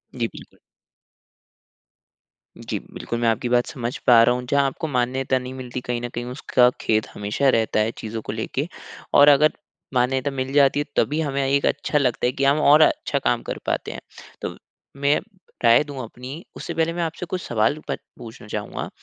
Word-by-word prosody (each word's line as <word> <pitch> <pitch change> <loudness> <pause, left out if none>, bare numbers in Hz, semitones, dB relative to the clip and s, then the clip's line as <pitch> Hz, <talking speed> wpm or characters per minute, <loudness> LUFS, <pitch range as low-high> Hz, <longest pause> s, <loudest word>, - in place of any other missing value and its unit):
जी, 120 -2 0
बिल्कुल। - - -14 2.0
जी, - - -4 0.2
बिल्कुल। 120 - -4
मैं 120 - +1
आपकी 115 +2 -1
बात 120 0 +3
समझ 120 -1 -4
पा 115 -2 +8
रहा 120 +1 +3
हुँ। 125 0 -5
जहाँ 140 -1 +3
आपको 135 +4 -3
मान्यता 130 0 0
नहीं 125 +1 -7
मिलती 125 -1 -6
कहीं 120 -1 -3
न 120 - -3
कहीं 120 +1 -5
उसका 125 -1 +2
खेद 110 -1 +1
हमेशा 105 +7 0
रहता 110 -3 +2
है 110 +1 +1
चीजों 110 0 -5
को - - -5
लेके। 130 +7 -3 0.5
और 145 +1 +7
अगर 150 +2 +6 0.4
मान्यता 130 +2 +1
मिल 130 0 -3
जाती 145 0 +4
तभी 150 +2 +2
हमें 140 -2 -1
एक 140 +1 +2
अच्छा 145 +1 0
लगता 130 -5 +1
है 125 - +3
कि 135 - -3
हम 140 +2 +4
और 150 +1 +6
अच्छा - - +2
काम - - +1
कर - - -4
पाते - - -2
हैं। - - -8 0.4
तो - - -4 0.5
मैं 140 +1 +3 0.4
राय 120 +4 +6
दूँ 140 -3 -7
अपनी 125 +7 -9
उससे - - -5
पहले 165 0 0
मैं 175 - -2
आपसे 165 +2 -4
कुछ 180 +1 -4
सवाल 115 +4 0
प - - 0 0.2
पूछना 115 -2 -11
चाहूँगा। 105 -1 -5
130 Hz, 190 wpm, -23 LUFS, 120-140 Hz, 2.0 s, पा